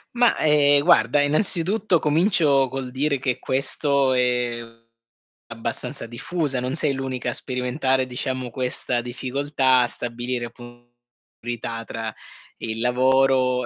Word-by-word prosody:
Ma, 240 Hz, -1 st, +3 dB
ehm, 145 Hz, -2 st, +4 dB
guarda, 120 Hz, +2 st, +4 dB
innanzitutto 180 Hz, +4 st, +2 dB
comincio 150 Hz, -4 st, +3 dB
col 130 Hz, 0 st, -5 dB
dire 140 Hz, +2 st, 0 dB
che 130 Hz, -2 st, -2 dB
questo 140 Hz, 0 st, +1 dB
è 125 Hz, -2 st, +1 dB, 0.9 s
abbastanza -, -, -6 dB
diffusa, 130 Hz, +4 st, -3 dB
non 125 Hz, +3 st, -3 dB
sei 155 Hz, -3 st, +1 dB
l'unica 130 Hz, -2 st, -3 dB
a -, -, -2 dB
sperimentare, 130 Hz, +1 st, -1 dB
diciamo, 130 Hz, 0 st, -4 dB
questa 125 Hz, 0 st, -2 dB
difficoltà 130 Hz, +2 st, 0 dB
a 120 Hz, -, +2 dB
stabilire 120 Hz, +1 st, -4 dB
appun 120 Hz, 0 st, -14 dB, 0.5 s
priorità 115 Hz, -1 st, -5 dB
tra 110 Hz, -1 st, -5 dB, 0.4 s
il 110 Hz, 0 st, -4 dB
lavoro, 130 Hz, 0 st, +2 dB
130 Hz, 120 wpm, -23 LUFS, 125-145 Hz, 0.9 s, ehm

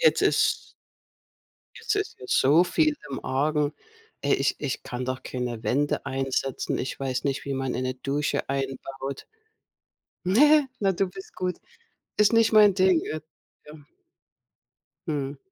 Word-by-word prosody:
jetzt -, -, +4 dB
ist -, -, +2 dB, 1.0 s
Jetzt 430 Hz, -, -2 dB
ist 410 Hz, -1 st, -2 dB
ja 125 Hz, -, -9 dB
so 145 Hz, +8 st, +5 dB
viel 310 Hz, -, +2 dB
im 135 Hz, -, -5 dB
Argen. 145 Hz, +2 st, 0 dB, 0.5 s
Ey, 140 Hz, -, +2 dB
ich 140 Hz, -, +1 dB
ich 140 Hz, -3 st, -3 dB
kann 125 Hz, +1 st, -5 dB
doch 130 Hz, 0 st, -4 dB
keine 120 Hz, -3 st, -4 dB
Wände 145 Hz, +4 st, 0 dB
einsetzen. 135 Hz, 0 st, -2 dB
Ich 130 Hz, -, -4 dB
weiß 130 Hz, -2 st, -2 dB
nicht, 140 Hz, -1 st, -2 dB
wie 140 Hz, -, -2 dB
man 135 Hz, -1 st, -2 dB
eine 130 Hz, 0 st, -1 dB
Dusche 140 Hz, +2 st, -2 dB
einbaut. 135 Hz, 0 st, -4 dB, 1.0 s
Ne, 290 Hz, +9 st, +5 dB
na 195 Hz, -1 st, +3 dB
du 190 Hz, +1 st, 0 dB
bist 190 Hz, +1 st, -11 dB
gut. 180 Hz, -1 st, -2 dB, 0.6 s
Ist 210 Hz, -1 st, +5 dB
nicht 230 Hz, -1 st, +4 dB
mein 210 Hz, -2 st, +7 dB
Ding, 185 Hz, -3 st, +4 dB
äh 155 Hz, 0 st, -4 dB, 0.4 s
ja. 150 Hz, -, -11 dB, 1.3 s
Mhm. 145 Hz, -2 st, -3 dB
140 Hz, 145 wpm, -26 LUFS, 135-185 Hz, 1.3 s, mein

